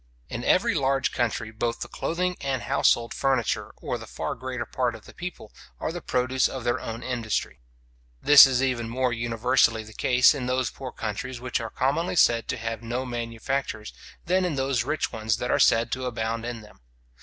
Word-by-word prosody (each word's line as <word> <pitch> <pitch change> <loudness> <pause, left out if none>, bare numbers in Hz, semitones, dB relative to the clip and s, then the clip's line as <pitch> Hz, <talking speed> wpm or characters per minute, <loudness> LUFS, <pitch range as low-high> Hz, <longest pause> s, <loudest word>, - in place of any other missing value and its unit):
In 120 - -5
every 190 +8 +3
large 135 -4 +1
country 110 -2 -1
both 115 +1 -2
the - - -3
clothing 180 +2 -2
and 135 -3 -2
household 115 0 +2
furniture 130 -4 0
or - - -2
the - - -10
far - - -4
greater 125 -1 -5
part 120 +1 -1
of - - -13
the - - -13
people, 175 -11 -8 0.3
are - - -2
the 175 +1 -6
produce 130 0 +1
of 130 -3 -6
their 120 +1 0
own 115 +1 -6
industry. 115 - -2 0.6
This 145 - +9
is 130 0 +1
even 120 -3 -1
more 125 0 0
universally 115 0 +2
the 110 0 -13
case 125 +5 +4
in 130 -4 -4
those 125 -2 0
poor 130 -2 -7
countries 120 +4 -5
which 125 +1 -2
are 115 - -4
commonly 145 +10 0
said 115 -8 +4
to - - -2
have 115 -1 -4
no 120 +3 -3
manufactures, 120 0 -3 0.3
than 185 +2 +2
in 175 -5 -1
those 135 -3 0
rich 155 +5 -1
ones 110 -1 0
that 125 - -2
are - - +2
said 115 +1 +4
to 130 0 -2
abound 115 -1 -3
in 120 -2 -5
them. 105 - -17
125 Hz, 195 wpm, -26 LUFS, 115-135 Hz, 0.6 s, This